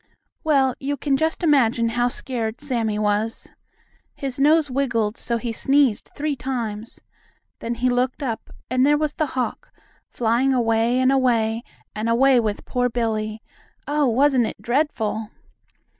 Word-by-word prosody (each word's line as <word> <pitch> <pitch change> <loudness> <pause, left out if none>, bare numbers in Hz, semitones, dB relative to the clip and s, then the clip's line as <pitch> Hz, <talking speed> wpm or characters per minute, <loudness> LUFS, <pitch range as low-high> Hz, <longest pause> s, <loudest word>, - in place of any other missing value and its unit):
Well, 275 -4 +3
you 285 +1 -2
can 280 -1 0
just 320 +5 -1
imagine 235 -7 +3
how 240 +1 +1
scared 240 -2 -3
Sammie 235 -7 -1
was. 210 +2 -1 0.6
His 270 -2 -4
nose 300 0 +4
wiggled 235 -5 0
so 235 -1 -2
he 235 0 -3
sneezed 270 -3 +2
three 295 0 -1
times. 235 -4 -5 0.6
Then 235 +1 -3
he 245 +2 0
looked 250 +3 0
up, 230 -4 -4 0.2
and 255 +1 +1
there 295 +2 +4
was 305 -1 -1
the 310 - -1
hawk, 250 - -3 0.4
flying 245 +3 +1
away, 230 +1 +2
and 260 +1 +3
away, 230 -4 +2 0.3
and 215 +2 -2
away 255 +2 +4
with 215 -3 -2
poor 245 0 0
Billie. 220 -2 -2 0.4
Oh, 295 -1 +2
wasn't 255 0 +3
it - - -7
dreadful! 230 -5 -1
245 Hz, 145 wpm, -22 LUFS, 225-275 Hz, 0.6 s, nose